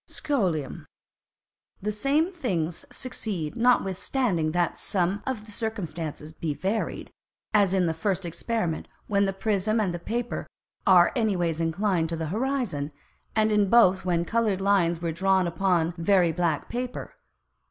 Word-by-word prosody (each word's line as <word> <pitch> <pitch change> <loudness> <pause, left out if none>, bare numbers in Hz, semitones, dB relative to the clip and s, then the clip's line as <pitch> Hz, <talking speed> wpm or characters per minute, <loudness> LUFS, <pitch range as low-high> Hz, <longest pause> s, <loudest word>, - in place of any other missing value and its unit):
Scholium. 180 - -2 0.9
The 210 +2 -2
same 280 - +1
Things 180 - -2
succeed, 200 -11 -4
notwithstanding 200 - +1
that 175 0 0
some 190 +1 0
of 235 -5 -3
the 215 - -11
Circumstances 170 -9 -4
be 155 -2 -3
varied; 200 +7 -2 0.4
as 200 -3 +4
in 185 -2 +3
the 165 - +1
first 190 +3 -1
Experiment 175 -1 -2 0.2
when 200 -1 +2
the 195 - 0
Prism 210 +2 0
and 175 -5 -1
Paper 240 +1 -3 0.4
are 180 -3 +7
any 220 -5 +1
ways 165 -2 -1
inclined 165 0 +1
to 165 - -2
the 160 -1 -3
Horizon, 225 - -1 0.4
and 215 0 +3
in 205 -2 +3
both 190 -5 +5
when 170 -2 +1
coloured 220 -3 +1
Lines 180 -4 +2
are 165 - 0
drawn 190 +2 +2
upon 170 -1 +1
very 175 -1 +4
black 165 -2 0
Paper. 250 +1 -5
190 Hz, 140 wpm, -26 LUFS, 170-220 Hz, 0.9 s, are